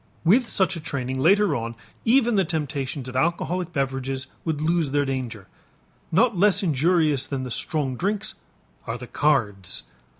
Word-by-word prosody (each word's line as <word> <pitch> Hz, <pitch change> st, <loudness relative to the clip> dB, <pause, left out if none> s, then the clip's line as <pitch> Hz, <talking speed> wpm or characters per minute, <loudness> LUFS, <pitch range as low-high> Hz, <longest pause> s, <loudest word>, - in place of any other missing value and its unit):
With 225 Hz, +8 st, +4 dB
such 190 Hz, -1 st, +2 dB
a -, -, -5 dB
training 130 Hz, -4 st, -3 dB
later 190 Hz, +3 st, +4 dB
on 115 Hz, -1 st, -4 dB, 0.3 s
even 240 Hz, 0 st, +4 dB
the 195 Hz, -2 st, +3 dB
temptations 145 Hz, -4 st, -3 dB
of 130 Hz, -, -7 dB
alcoholic 170 Hz, +4 st, 0 dB
beverages 135 Hz, -2 st, -2 dB, 0.2 s
would 160 Hz, -3 st, -1 dB
lose 165 Hz, -1 st, +1 dB
their 145 Hz, +1 st, +1 dB
danger. 125 Hz, -7 st, -4 dB, 0.7 s
Not 225 Hz, +6 st, +3 dB
less 195 Hz, +1 st, +4 dB
injurious 155 Hz, -3 st, +2 dB
than 135 Hz, -2 st, -3 dB
the 125 Hz, -, -5 dB
strong 140 Hz, -1 st, -2 dB
drinks 205 Hz, -, -2 dB, 0.5 s
are -, -, -2 dB
the -, -, -8 dB
cards. 110 Hz, -, 0 dB
150 Hz, 155 wpm, -24 LUFS, 130-180 Hz, 0.7 s, With